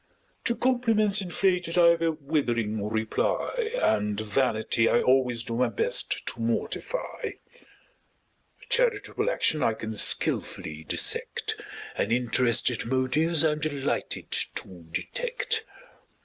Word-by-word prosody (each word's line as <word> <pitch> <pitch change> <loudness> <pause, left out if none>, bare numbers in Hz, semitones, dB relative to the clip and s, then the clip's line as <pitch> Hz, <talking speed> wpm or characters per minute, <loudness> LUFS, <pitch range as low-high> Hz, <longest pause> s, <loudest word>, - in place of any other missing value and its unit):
To 235 - +2
compliments 225 -5 +2
inflated 180 -2 0
I've 170 -1 +6
a 165 0 +2
withering 120 -9 -1
reply; 110 - -1
And 105 -1 +1
vanity 110 0 +1
I - - +4
always 125 -2 +2
do 115 - -5
my 125 -1 +2
best 105 - 0
to 115 - -2
mortify; 115 - -2
A - - -14
charitable 465 -2 +1
action 155 - +1
I 115 - +3
can 110 0 -6
skilfully 80 -5 -1
dissect: - - -1 0.3
And 100 - -1
interested 120 0 +1
motives 150 +6 +2
I'm 150 -1 +2
delighted 145 -3 -2 0.2
to 90 -3 -6
detect. 480 - -2
135 Hz, 110 wpm, -27 LUFS, -, 0.3 s, I've